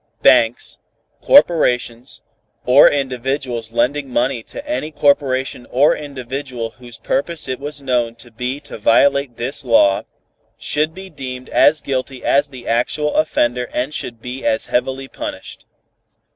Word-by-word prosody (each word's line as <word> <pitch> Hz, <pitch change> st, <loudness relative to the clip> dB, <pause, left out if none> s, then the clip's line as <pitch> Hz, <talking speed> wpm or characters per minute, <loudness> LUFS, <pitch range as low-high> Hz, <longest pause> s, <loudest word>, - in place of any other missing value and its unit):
Banks, -, -, +3 dB, 0.4 s
corporations 125 Hz, -, +3 dB, 0.4 s
or 130 Hz, +3 st, +7 dB
individuals 130 Hz, -3 st, -2 dB
lending 130 Hz, +4 st, 0 dB
money 125 Hz, 0 st, 0 dB
to 285 Hz, -, -10 dB
any 295 Hz, -, -2 dB
corporation 135 Hz, -4 st, +1 dB
or 140 Hz, +4 st, +4 dB
individual 130 Hz, -4 st, -5 dB
whose 120 Hz, -2 st, -12 dB
purpose 155 Hz, +2 st, -2 dB
it 130 Hz, -1 st, -3 dB
was 145 Hz, 0 st, -5 dB
known 120 Hz, -3 st, 0 dB
to 120 Hz, 0 st, -14 dB
be 125 Hz, +4 st, -4 dB
to 145 Hz, -, -9 dB
violate 135 Hz, +3 st, +3 dB
this 130 Hz, +4 st, -4 dB
law, 115 Hz, -5 st, +4 dB, 0.6 s
should 155 Hz, +2 st, -1 dB
be 190 Hz, 0 st, -10 dB
deemed 130 Hz, -3 st, -7 dB
as 150 Hz, 0 st, +4 dB
guilty 130 Hz, -1 st, -4 dB
as 140 Hz, +2 st, +3 dB
the 130 Hz, -4 st, -12 dB
actual 145 Hz, +6 st, 0 dB
offender 125 Hz, -5 st, +1 dB
and 130 Hz, +5 st, -2 dB
should 120 Hz, -6 st, -6 dB
be 125 Hz, +2 st, -6 dB
as 110 Hz, -, +1 dB
heavily 130 Hz, +2 st, -1 dB
punished. -, -, -8 dB
130 Hz, 135 wpm, -18 LUFS, 120-145 Hz, 0.6 s, or